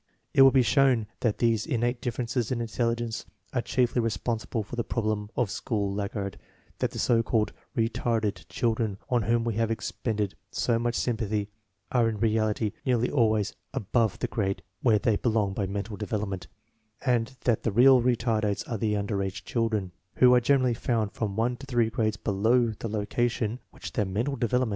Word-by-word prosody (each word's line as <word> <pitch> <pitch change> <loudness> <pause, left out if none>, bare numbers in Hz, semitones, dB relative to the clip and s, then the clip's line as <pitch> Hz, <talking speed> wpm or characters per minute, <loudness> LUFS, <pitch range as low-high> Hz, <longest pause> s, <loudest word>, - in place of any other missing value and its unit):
It - - +6
will 135 - +10
be 130 -1 +4
shown 125 -2 +3
that 115 -4 0
these 115 -3 +2
in 115 - 0
nate 120 +1 0
differences 120 0 -2
in 125 - 0
intelligence 115 0 -1 0.3
are 120 - +1
chiefly 120 0 +1
responsible 115 +1 -2
for 105 - -8
the 120 - -1
problem 110 -3 -2
of 120 -5 +1
the - - -4
school 100 -3 -1
laggard; 100 -1 -3 0.4
that - - +1
the - - -9
so 115 -2 +3
called 110 -1 0 0.2
"retarded" 115 -2 0
children 110 -4 0
on 120 -1 +3
whom 115 +2 +1
we 115 -1 -1
have 115 -1 +1
expended 110 -2 -2 0.2
so 115 -1 0
much 120 0 -1
sympathy 110 -3 -1 0.4
are 120 -3 +3
in 110 - -3
reality 110 0 +1
nearly 125 -1 +1
always 110 -6 +2 0.2
above 110 -2 +1
the - - -2
grade 100 -3 -2 0.2
where 115 -4 +4
they 105 0 +1
belong 110 -4 +1
by 100 -1 -1
mental 100 +2 -4
development; 100 -3 -3 0.6
and 125 0 +1
that 120 -3 +1
the 115 - 0
real 125 +4 +7
retardates 115 -4 0
are 115 -4 -3
the 105 -1 +1
under 100 0 -1
age 95 -1 -4
children, 110 -6 -1 0.2
who 125 -1 +6
are 125 - +5
generally 130 -1 +3
found 115 -3 -1
from' 105 -3 -3
one 120 +3 +1
to 135 - -11
three 120 -3 +1
grades 110 -1 0
below 110 +4 +2
the 115 - -4
location 110 +2 -1
which - - -9
their 105 - +1
mental 115 +9 -1
development 120 -3 -1
would 125 - +4
warrant. 125 -2 +1
115 Hz, 185 wpm, -27 LUFS, 105-120 Hz, 0.6 s, will